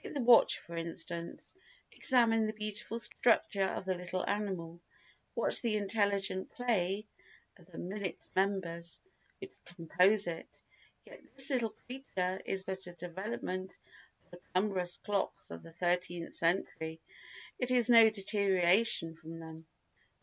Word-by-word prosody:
Take -, -, -8 dB
the 280 Hz, -, 0 dB
watch 240 Hz, -1 st, +6 dB
for 170 Hz, -, -10 dB
instance. 170 Hz, 0 st, -3 dB, 0.5 s
Examine 225 Hz, -4 st, +3 dB
the 215 Hz, -, -3 dB
beautiful 215 Hz, +1 st, -3 dB
structure 230 Hz, -2 st, +2 dB
of -, -, -4 dB
the 190 Hz, -, 0 dB
little 180 Hz, +1 st, -4 dB
animal, 185 Hz, -5 st, -3 dB, 0.5 s
watch -, -, +2 dB
the 225 Hz, -3 st, +1 dB
intelligent 200 Hz, -2 st, 0 dB
play 210 Hz, -4 st, 0 dB, 0.5 s
of -, -, -20 dB
the -, -, -13 dB
minute 190 Hz, +1 st, -4 dB, 0.2 s
members 180 Hz, -4 st, -1 dB, 0.4 s
which 385 Hz, 0 st, -10 dB
compose 180 Hz, +4 st, +2 dB
it; 170 Hz, -1 st, -5 dB, 0.6 s
yet -, -, -14 dB
this 270 Hz, +1 st, +3 dB
little 240 Hz, -4 st, 0 dB
creature 190 Hz, -8 st, -3 dB
is 190 Hz, -1 st, -1 dB
but 190 Hz, 0 st, -4 dB
a 175 Hz, -, -9 dB
development 185 Hz, +2 st, -5 dB, 0.6 s
of -, -, -32 dB
the 175 Hz, -, -12 dB, 0.2 s
cumbrous 185 Hz, -2 st, +2 dB
clocks 200 Hz, -, -3 dB
of 85 Hz, -, -7 dB
the 165 Hz, -, -13 dB
thirteenth 175 Hz, 0 st, -2 dB
century—it 165 Hz, +7 st, -3 dB
is 245 Hz, -2 st, +3 dB
no 230 Hz, -2 st, +8 dB
deterioration 195 Hz, -3 st, +3 dB
from 165 Hz, 0 st, -10 dB
them. 160 Hz, 0 st, -10 dB
190 Hz, 135 wpm, -33 LUFS, 175-215 Hz, 0.6 s, no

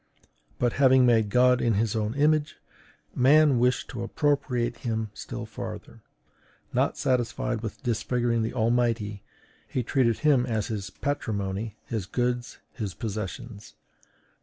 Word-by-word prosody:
But 120 Hz, -1 st, +1 dB
having 130 Hz, -1 st, +6 dB
made 115 Hz, -3 st, +3 dB
God 125 Hz, +2 st, +4 dB
in 115 Hz, -3 st, +2 dB
his 110 Hz, +1 st, 0 dB
own 110 Hz, +2 st, -1 dB
image, 150 Hz, +1 st, +2 dB, 0.6 s
man 140 Hz, 0 st, +5 dB
wished 125 Hz, +1 st, +1 dB
to 120 Hz, -, -5 dB
appropriate 125 Hz, -2 st, 0 dB
him 110 Hz, -3 st, -3 dB
still -, -, -6 dB
farther; -, -, -8 dB, 0.7 s
not -, -, +1 dB
satisfied 125 Hz, -2 st, 0 dB
with 110 Hz, -3 st, -7 dB
disfiguring 120 Hz, 0 st, 0 dB
the 110 Hz, -, -1 dB
Almighty, 115 Hz, -3 st, 0 dB, 0.5 s
he 125 Hz, -, -2 dB
treated 115 Hz, -2 st, +2 dB
him 145 Hz, -5 st, +3 dB
as 110 Hz, -4 st, -1 dB
his 100 Hz, -4 st, -4 dB
patrimony, 105 Hz, -5 st, -3 dB
his 110 Hz, -5 st, -4 dB
goods, 125 Hz, +2 st, -2 dB, 0.2 s
his 105 Hz, -7 st, -5 dB
possessions. 110 Hz, 0 st, -6 dB
120 Hz, 130 wpm, -27 LUFS, 110-125 Hz, 0.7 s, having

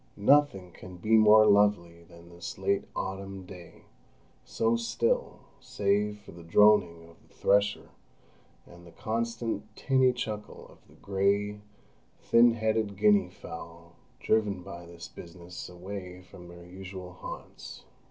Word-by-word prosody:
Nothing 105 Hz, -5 st, +3 dB
can 90 Hz, +1 st, -12 dB
be 110 Hz, +5 st, +2 dB
more 110 Hz, 0 st, +7 dB
lovely 100 Hz, -5 st, +2 dB
than 85 Hz, 0 st, -16 dB
this 85 Hz, 0 st, -8 dB
late 95 Hz, +1 st, 0 dB
autumn 95 Hz, 0 st, -5 dB
day, 90 Hz, -3 st, -13 dB, 0.6 s
so 115 Hz, +1 st, 0 dB
still, 115 Hz, 0 st, -1 dB, 0.2 s
save 105 Hz, +1 st, -1 dB
for -, -, -14 dB
the 85 Hz, -, -12 dB
droning 85 Hz, -2 st, +3 dB
of 85 Hz, -, -18 dB
the -, -, -29 dB
thresher 100 Hz, +1 st, +1 dB, 0.7 s
and 85 Hz, 0 st, -16 dB
the -, -, -14 dB
constant 115 Hz, +2 st, -3 dB
tinny 130 Hz, -1 st, +3 dB
chuckle 110 Hz, -4 st, -6 dB
of -, -, -19 dB
the -, -, -20 dB
grey, 100 Hz, +1 st, -1 dB, 0.6 s
thin 115 Hz, 0 st, +5 dB
headed 110 Hz, -3 st, -1 dB
Guinea 100 Hz, -3 st, +4 dB
fowl, 85 Hz, -1 st, -11 dB, 0.3 s
driven 105 Hz, -4 st, 0 dB
by 85 Hz, 0 st, -10 dB
this 85 Hz, 0 st, -10 dB
business 85 Hz, +1 st, -10 dB
away 90 Hz, 0 st, -8 dB
from 90 Hz, -1 st, -14 dB
their 85 Hz, 0 st, -13 dB
usual 95 Hz, 0 st, -9 dB
haunts. -, -, -10 dB
100 Hz, 135 wpm, -28 LUFS, 85-105 Hz, 0.7 s, more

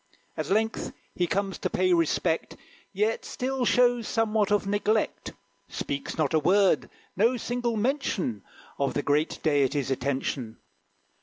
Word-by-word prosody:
At -, -, -4 dB
length 220 Hz, +3 st, 0 dB, 0.2 s
he 175 Hz, -, 0 dB
comes 195 Hz, 0 st, -1 dB
to -, -, -1 dB
pay 185 Hz, 0 st, +2 dB
respect, 165 Hz, 0 st, 0 dB, 0.3 s
Yet 210 Hz, +3 st, 0 dB
still 260 Hz, 0 st, -2 dB
shows 245 Hz, -2 st, +3 dB
somewhat 215 Hz, -2 st, +1 dB
of 205 Hz, -1 st, +2 dB
neglect; 205 Hz, +2 st, 0 dB, 0.4 s
Speaks 140 Hz, 0 st, -4 dB
not 155 Hz, -3 st, +1 dB
a 160 Hz, -, +4 dB
word: 180 Hz, -5 st, +3 dB, 0.3 s
no 230 Hz, +6 st, +3 dB
single 240 Hz, -1 st, -2 dB
mention 225 Hz, -, -1 dB, 0.4 s
Of 140 Hz, -1 st, 0 dB
the 145 Hz, -, 0 dB
great 150 Hz, +3 st, +1 dB
deities' 140 Hz, -2 st, +1 dB
attention. 130 Hz, -3 st, -2 dB
195 Hz, 135 wpm, -27 LUFS, 145-225 Hz, 0.4 s, a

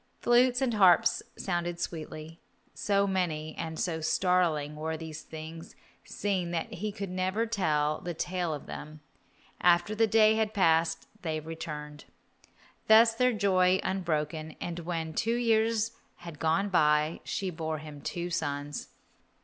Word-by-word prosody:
Flutes 245 Hz, +2 st, +4 dB
and 245 Hz, -3 st, +1 dB
harps 190 Hz, -5 st, +5 dB, 0.2 s
sounded 175 Hz, -2 st, -2 dB
sweetly. 160 Hz, -1 st, -6 dB, 0.3 s
So 200 Hz, -1 st, +1 dB
many 165 Hz, -5 st, -1 dB
and 160 Hz, -1 st, -5 dB
so 165 Hz, -3 st, -1 dB
startling 160 Hz, -3 st, +1 dB
were 160 Hz, +1 st, -3 dB
the 160 Hz, 0 st, -7 dB
things 160 Hz, +1 st, -9 dB, 0.3 s
seen 190 Hz, -4 st, -2 dB
that 170 Hz, -1 st, -3 dB
he 210 Hz, +4 st, -3 dB
could 200 Hz, -3 st, -6 dB
never 185 Hz, +5 st, 0 dB
tell 155 Hz, -9 st, 0 dB
the 175 Hz, -1 st, -5 dB
tale 175 Hz, 0 st, -2 dB
of 150 Hz, -2 st, -5 dB
them. 155 Hz, 0 st, -8 dB, 0.6 s
After 175 Hz, +3 st, +4 dB
the 225 Hz, +1 st, +3 dB
day 220 Hz, 0 st, +5 dB
had 220 Hz, -1 st, 0 dB
passed 165 Hz, -3 st, +2 dB
they 160 Hz, -3 st, -2 dB
returned. 150 Hz, -2 st, -7 dB, 0.8 s
Thus 225 Hz, +1 st, +7 dB
was 225 Hz, -, -14 dB
their 250 Hz, 0 st, +3 dB
joy 190 Hz, -3 st, +3 dB
unbroken, 155 Hz, -4 st, -2 dB
and 175 Hz, 0 st, -4 dB
when 165 Hz, -2 st, -3 dB
two 230 Hz, +7 st, 0 dB
years 225 Hz, -1 st, +2 dB, 0.2 s
had 170 Hz, -4 st, -10 dB
gone 165 Hz, +6 st, +1 dB
by 150 Hz, -2 st, +3 dB
she 190 Hz, -2 st, -3 dB
bore 160 Hz, -1 st, -3 dB
him 150 Hz, -1 st, -10 dB
two 175 Hz, +3 st, -4 dB
sons. 145 Hz, -3 st, -3 dB
170 Hz, 145 wpm, -29 LUFS, 155-200 Hz, 0.8 s, Thus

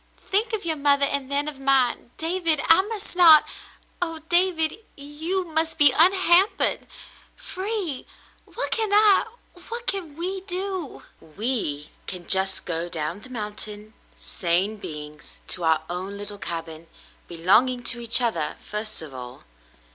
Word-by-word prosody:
Think 425 Hz, +5 st, +1 dB
of 415 Hz, -5 st, -3 dB
your 320 Hz, -2 st, -1 dB
mother, 280 Hz, 0 st, +4 dB
and 280 Hz, -1 st, -2 dB
then 285 Hz, +1 st, 0 dB
of 295 Hz, -3 st, -6 dB
mine. 270 Hz, -3 st, +1 dB
David, 330 Hz, -2 st, 0 dB
I 330 Hz, +3 st, +8 dB
must 415 Hz, -2 st, -5 dB
not 325 Hz, -4 st, +8 dB, 0.3 s
— -, -, -32 dB
Oh, 330 Hz, -2 st, -1 dB
David! 345 Hz, -1 st, +2 dB, 0.2 s
You 315 Hz, +6 st, -3 dB
must 320 Hz, 0 st, -1 dB
be 290 Hz, -3 st, +6 dB
unhampered 375 Hz, +2 st, +3 dB, 0.2 s
— -, -, -26 dB
free 375 Hz, -, -5 dB, 0.2 s
— -, -, -31 dB
what -, -, -2 dB
can 440 Hz, -3 st, 0 dB
I 415 Hz, -1 st, +5 dB, 0.2 s
— 355 Hz, -1 st, -19 dB
what 470 Hz, +1 st, -5 dB
can 345 Hz, -9 st, -4 dB
wedo.^" 375 Hz, -2 st, -4 dB, 0.3 s
"We 205 Hz, -, -2 dB, 0.2 s
can 180 Hz, -2 st, -6 dB
just 190 Hz, 0 st, +1 dB
go 170 Hz, 0 st, -3 dB
down 165 Hz, +4 st, -4 dB
the 255 Hz, -, -14 dB
mountain, 210 Hz, -2 st, -7 dB, 0.2 s
sane 190 Hz, +3 st, -1 dB
beings, 150 Hz, -5 st, -9 dB
to 180 Hz, -, 0 dB
our 160 Hz, -1 st, +2 dB
own 185 Hz, +3 st, -5 dB
little 205 Hz, 0 st, -8 dB
cabin, 165 Hz, -2 st, -5 dB, 0.4 s
belonging 215 Hz, +9 st, +2 dB
to 240 Hz, 0 st, 0 dB
each 235 Hz, +1 st, +4 dB
other 220 Hz, -11 st, -1 dB
first 215 Hz, -3 st, -4 dB
of 150 Hz, -4 st, -10 dB
all." 125 Hz, -1 st, -9 dB
280 Hz, 150 wpm, -24 LUFS, -, 0.4 s, I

